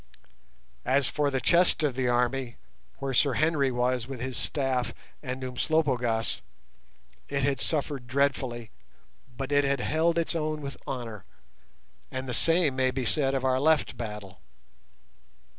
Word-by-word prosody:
As 135 Hz, +2 st, +3 dB
for 150 Hz, -1 st, +1 dB
the 135 Hz, -1 st, 0 dB
chest 170 Hz, +2 st, +4 dB
of 145 Hz, -3 st, +2 dB
the 130 Hz, 0 st, 0 dB
army 120 Hz, 0 st, 0 dB, 0.4 s
where 135 Hz, -1 st, -3 dB
Sir 140 Hz, +2 st, +4 dB
Henry 155 Hz, -3 st, +2 dB
was 125 Hz, 0 st, 0 dB
with 135 Hz, -2 st, -6 dB
his 130 Hz, +1 st, -4 dB
staff 130 Hz, -3 st, -1 dB, 0.3 s
and 130 Hz, -1 st, -4 dB
Umslopogaas, 125 Hz, -4 st, 0 dB, 0.9 s
it 140 Hz, -1 st, -1 dB
had 135 Hz, -1 st, +1 dB
suffered 145 Hz, -5 st, -2 dB
dreadfully, 130 Hz, -3 st, 0 dB, 0.7 s
but 135 Hz, +1 st, -4 dB
it 145 Hz, 0 st, +4 dB
had 140 Hz, -1 st, +1 dB
held 160 Hz, +5 st, +1 dB
its 170 Hz, -, 0 dB
own 155 Hz, -1 st, -1 dB
with 140 Hz, -1 st, -5 dB
honour, 115 Hz, -6 st, -5 dB, 0.9 s
and 130 Hz, 0 st, -4 dB
the 125 Hz, -, -3 dB
same 165 Hz, 0 st, +3 dB
may 130 Hz, 0 st, +2 dB
be 130 Hz, -1 st, -2 dB
said 135 Hz, +4 st, +1 dB
of 130 Hz, -1 st, -1 dB
our 130 Hz, 0 st, +3 dB
left 155 Hz, -1 st, +3 dB
battle. 105 Hz, -5 st, -7 dB
135 Hz, 145 wpm, -28 LUFS, 125-145 Hz, 0.9 s, chest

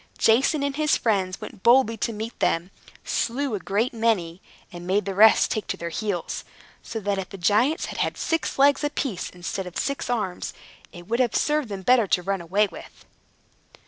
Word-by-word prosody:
Jason 270 Hz, +6 st, +3 dB
and 280 Hz, 0 st, -2 dB
his 305 Hz, -1 st, +3 dB
friends 195 Hz, -5 st, 0 dB
went -, -, -10 dB
boldly 235 Hz, -1 st, +5 dB
to 230 Hz, +2 st, -2 dB
meet 220 Hz, +2 st, -6 dB
them, 170 Hz, +3 st, 0 dB, 0.3 s
slew 260 Hz, +2 st, -1 dB
a 205 Hz, -, -1 dB
great 205 Hz, +8 st, -1 dB
many, 205 Hz, -7 st, 0 dB, 0.3 s
and 175 Hz, -1 st, -9 dB
made 195 Hz, +1 st, +1 dB
the 195 Hz, -, -3 dB
rest 215 Hz, +3 st, +6 dB
take 215 Hz, -, -2 dB
to -, -, -3 dB
their 170 Hz, -, -4 dB
heels, 195 Hz, -1 st, -3 dB, 0.4 s
so 225 Hz, -, -5 dB
that 200 Hz, -1 st, -1 dB
if 185 Hz, -, -5 dB
the 195 Hz, -, -9 dB
giants 215 Hz, -, +2 dB
had -, -, -6 dB
had -, -, -1 dB
six 325 Hz, -1 st, -1 dB
legs 280 Hz, +1 st, +4 dB
apiece 275 Hz, -9 st, -2 dB
instead 180 Hz, +1 st, -5 dB
of 180 Hz, -, -8 dB
six 280 Hz, -2 st, -2 dB
arms, 210 Hz, -7 st, -2 dB, 0.4 s
it 175 Hz, 0 st, -12 dB
would 235 Hz, +3 st, -1 dB
have 245 Hz, -3 st, +1 dB
served 300 Hz, -5 st, +1 dB
them 195 Hz, -2 st, -6 dB
better 245 Hz, -1 st, +4 dB
to 180 Hz, -, +1 dB
run 195 Hz, 0 st, -1 dB
away 195 Hz, +5 st, +2 dB
with. -, -, -12 dB
215 Hz, 195 wpm, -24 LUFS, 190-250 Hz, 0.4 s, rest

